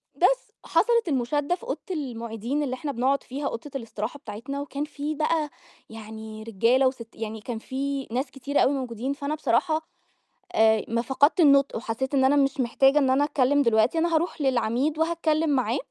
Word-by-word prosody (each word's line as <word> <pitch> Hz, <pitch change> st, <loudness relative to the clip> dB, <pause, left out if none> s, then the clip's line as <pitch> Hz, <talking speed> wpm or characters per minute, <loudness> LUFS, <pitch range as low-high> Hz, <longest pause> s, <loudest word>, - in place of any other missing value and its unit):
بس -, -, +2 dB
حصلت 470 Hz, -5 st, +2 dB
المُشادّة 290 Hz, +4 st, 0 dB
في 375 Hz, -, -19 dB
أوضة 485 Hz, -, -3 dB
المُعيدين 240 Hz, -, -3 dB
اللي 255 Hz, -3 st, -2 dB
إحنا 285 Hz, +3 st, -3 dB
بنقعُد 270 Hz, +2 st, +1 dB
فيها 280 Hz, +2 st, -4 dB
أوضة 275 Hz, +4 st, -6 dB
الاستراحة 230 Hz, +1 st, -4 dB
بتاعتنا، 245 Hz, +6 st, -6 dB
وكان 285 Hz, 0 st, -4 dB
في 300 Hz, 0 st, -4 dB
بقى 310 Hz, 0 st, 0 dB, 0.4 s
يعني 220 Hz, 0 st, -9 dB
رجالة 230 Hz, +5 st, +3 dB
وست 245 Hz, -3 st, -4 dB
يعني 220 Hz, -1 st, -6 dB
كان 230 Hz, +1 st, -5 dB
في 275 Hz, +2 st, -3 dB
ناس 255 Hz, +3 st, -2 dB
كتير 280 Hz, +2 st, 0 dB
أوي 270 Hz, -, +3 dB
موجودين، 255 Hz, 0 st, -3 dB
فأنا 285 Hz, +2 st, -3 dB
بصراحة 310 Hz, +4 st, +1 dB, 0.7 s
آآ، 220 Hz, -1 st, +4 dB
ما 230 Hz, +1 st, 0 dB
فقدت 285 Hz, +7 st, +2 dB
النُطق 280 Hz, -4 st, +5 dB
وحسّيت 235 Hz, +4 st, -3 dB
إن 265 Hz, -1 st, +3 dB
أنا 280 Hz, +2 st, +4 dB
مش 275 Hz, -1 st, +2 dB
محتاجة 270 Hz, +4 st, +4 dB
إن 270 Hz, -3 st, +2 dB
أنا 270 Hz, +2 st, +3 dB
أتكلِّم 285 Hz, -1 st, +2 dB
دلوقتي، 230 Hz, +3 st, +3 dB
أنا 335 Hz, +1 st, +1 dB
هاروح 325 Hz, 0 st, -1 dB
للعميد 260 Hz, +3 st, +1 dB
وهاتكلِّم 320 Hz, -1 st, +1 dB
معاه 255 Hz, -3 st, +1 dB
270 Hz, 175 wpm, -25 LUFS, 235-290 Hz, 0.7 s, النُطق